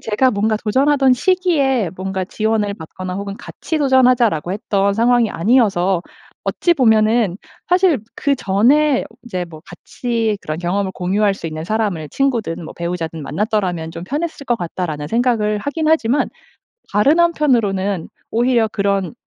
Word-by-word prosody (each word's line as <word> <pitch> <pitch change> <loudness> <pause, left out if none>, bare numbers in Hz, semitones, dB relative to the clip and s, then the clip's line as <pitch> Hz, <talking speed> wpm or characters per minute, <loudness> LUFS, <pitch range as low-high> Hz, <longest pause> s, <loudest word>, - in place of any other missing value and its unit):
제가 225 +4 +1
뭔가 215 +1 +1
도전하던 270 +4 +3
시기에 280 - +1
뭔가 190 0 -3
지원을 215 0 -1
받거나 180 +2 -7
혹은 200 +1 -5
"같이 320 - -5
도전하자."라고 250 - +3
했던 200 -1 0
상황이 235 +1 +2
아니어서 195 -4 +2 0.4
어찌 345 -1 +1
보면은 220 - +3 0.3
사실 360 -3 +3 0.2
'그전에 275 +3 +2 0.2
이제 185 -7 -3
뭐 160 -2 -11
같이 225 +3 -3
그런 155 +1 -4
경험을 190 +3 -1
공유할 200 +3 +1
수 195 - -7
있는 155 0 -5
사람을 200 -6 -2
친구든 230 -11 -1
뭐 - - -9
배우자든 170 -2 -4
만났더라면 175 0 -2
좀 165 - -7
편했을 295 - -4
것 240 - +1
같다.'라는 165 -4 -4
생각을 225 -3 +1
하긴 295 +7 -3
하지만 290 -4 +2 0.6
다른 275 +11 +3
한편으로는 220 - +1 0.2
오히려 235 -1 +2
그런 200 -2 -1
215 Hz, 340 characters per minute, -18 LUFS, 185-255 Hz, 0.6 s, 도전하던